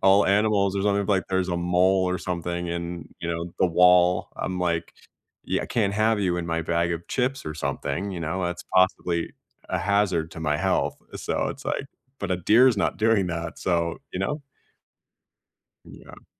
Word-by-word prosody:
all 95 +1 +5
animals 100 -1 +2
or 95 - 0
something, 100 -1 +1
like, 95 -3 +2
there's 95 -1 0
a 85 - -1
mole 90 +2 +2
or 90 0 -1
something 85 0 -3
in, 85 0 -5
you 85 - -4
know, 85 +1 -3
the 95 - +4
wall 90 +1 +4
I'm 90 - -3
like, 85 -2 -1 0.5
"Yeah, - - -1
I - - -5
can't 105 -4 0
have 110 +1 +2
you 90 -3 +1
in 85 -1 -3
my 80 0 -1
bag 85 +1 0
of 85 0 -5
chips 130 +1 -1
or 75 - -4
something," 85 +4 -3
you 90 -3 -5
know? 85 +4 -2
That's 90 0 -3
possibly 90 -2 +2 0.4
a - - -1
hazard 100 -5 +1
to 80 - -8
my 75 -2 0
health, - - 0 0.2
so - - -1
it's, - - -7
like - - -2 0.3
but - - -3
a 90 - +2
deer 110 +9 +5
is 115 - +1
not - - 0
doing 110 -3 +2
that, 85 -1 -4
so, 85 -2 0
you - - -3
know? 150 +10 -2 1.4
Yeah. - - -14
90 Hz, 190 wpm, -25 LUFS, 85-100 Hz, 1.4 s, all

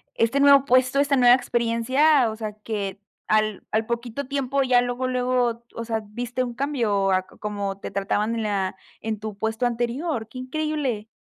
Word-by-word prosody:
este 230 +5 +2
nuevo 280 -1 +6
puesto, 255 +1 +3
esta 280 0 +3
nueva 245 -1 +7
experiencia, 250 +3 +2
o 220 - -5
sea, 215 -2 -4
que 210 -2 -5 0.3
al 215 -1 +1
al 220 +1 +1
poquito 235 +3 -4
tiempo 275 0 0
ya 250 -1 +4
luego 245 +1 -2
luego, 250 -2 0
o 230 - -4
sea, 225 -1 -2
viste 245 +4 -3
un 240 -1 -4
cambio 230 -8 0
a 185 0 +2
como 200 -2 -5
te - - -7
trataban 205 +3 0
en 225 - -2
la 195 -3 -1 0.3
en 220 -1 -3
tu 215 -1 -6
puesto 220 +3 -1
anterior, 240 +1 -2
qué 255 - -11
increíble. 260 -4 -2
235 Hz, 175 wpm, -24 LUFS, 215-255 Hz, 0.3 s, nueva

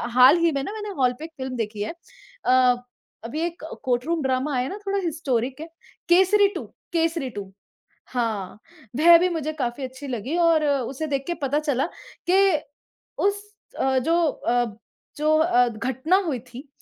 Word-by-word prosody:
हाल 260 +6 +8
ही 335 -1 +3
में 275 -2 -1
न - - -5
मैंने 420 -1 -5
हॉल 250 -1 +3
पे 315 - -6
एक 325 - -11
फ़िल्म 260 -1 -4
देखी 215 -2 -3
है। - - -3 0.5
अ, 255 0 +5 0.5
अभी 295 +7 -4
एक 340 -2 -6 0.2
कोर्ट 250 0 0
रूम 335 -1 0
ड्रामा 265 +2 0
आया 250 +1 0
न 400 - -5
थोड़ा 395 0 +1
हिस्टोरिक 270 -5 -1
है। 325 - -6 0.4
केसरी 380 +3 +5
2, - - -3 0.3
केसरी 330 -4 0
2 195 -1 -8 0.6
हाँ, 220 -7 -2 0.4
वह 340 +1 +9
भी 360 +2 +2
मुझे 315 -3 -2
काफ़ी 260 -2 -3
अच्छी 260 +2 -7
लगी 250 +4 -3
और 335 -2 +4
उसे 275 +1 -1
देख 275 -2 -1
के 345 - 0
पता 285 +2 +1
चला 280 -4 0 0.4
के 380 +2 +5 0.9
उस 405 0 -1 0.4
अ, 265 0 +2
जो 330 +6 +1
अ 245 -3 0 0.5
जो 305 +1 +3
अ, 245 -7 +4
घटना 260 - 0
हुई 275 -7 -1
थी 250 +4 -12
275 Hz, 175 wpm, -24 LUFS, 250-330 Hz, 0.9 s, वह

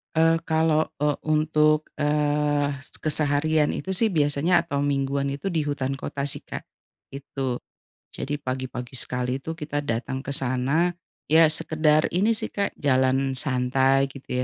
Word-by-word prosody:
Eee, 165 +1 +4
kalau, 160 -1 +1
eee, 150 0 +1
untuk, 155 0 +2
eee, 150 -1 +1 0.2
s - - -8
keseharian 150 0 +2
itu, 190 0 -3
sih, 220 +3 +3
biasanya, 150 +2 +2
atau 140 -3 -1
mingguan 140 0 0
itu, 140 +8 -5
di 165 -5 0
hutan 135 -2 -2
kota, 140 0 -4
sih, 145 - -4
Kak. - - -8 0.5
Itu. 135 -2 -4 0.5
Jadi 145 +2 -3
pagi-pagi 130 -2 -5
sekali 125 +1 0
itu, 160 +2 -6
kita 145 -1 -3
datang 130 +1 -3
ke 135 - -6
sana. 135 +6 +1 0.3
Ya, 160 0 +5
sekedar 155 -1 +3
ini, 210 +5 +2
sih, - - -5
Kak, 200 -1 0
jalan 130 -1 +2
santai 130 +1 +2
gitu, 140 - -13
145 Hz, 145 wpm, -24 LUFS, 135-155 Hz, 0.5 s, Ya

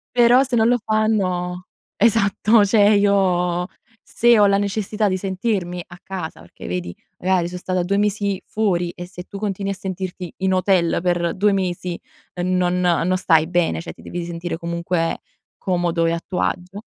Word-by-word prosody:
Però 245 +2 +6
se 255 -3 -1
non 220 0 +4
lo 245 +1 +3
fanno 185 -5 0 0.3
esatto 215 0 +3
cioè 205 0 +4
io 180 -3 +2 0.4
se 240 0 +3
ho 205 - +6
la 200 0 +4
necessità 205 +1 -1
di 185 - 0
sentirmi 190 -2 -2
a 175 - -12
casa 180 - -6
perché 85 - -12
vedi, 90 0 -4 0.3
magari 185 -2 +1
son 180 +1 -6
stata 185 0 -1
2 195 +3 0
mesi 205 -1 0
fuori 180 -5 0
e 175 0 -8
se 180 -1 -9
tu 200 - -9
continui 200 -1 -2
a - - -3
sentirti 185 -2 -6
in 190 0 0
hotel 185 -2 +2
per 175 -1 0
2 205 +2 +2
mesi 180 -2 -2 0.4
e 175 - -4
non 180 0 +1
non 180 0 +2
stai 160 -4 +3
bene, 175 -1 0
cioè 165 - -7
ti - - -17
devi 175 -1 -5
sentire 170 0 -4
comunque 170 0 -2 0.4
comodo 175 -2 0
e - - +1
a 170 - -1
tuo 180 - -2
agio. 185 +3 -3
185 Hz, 175 wpm, -21 LUFS, 175-200 Hz, 0.4 s, Però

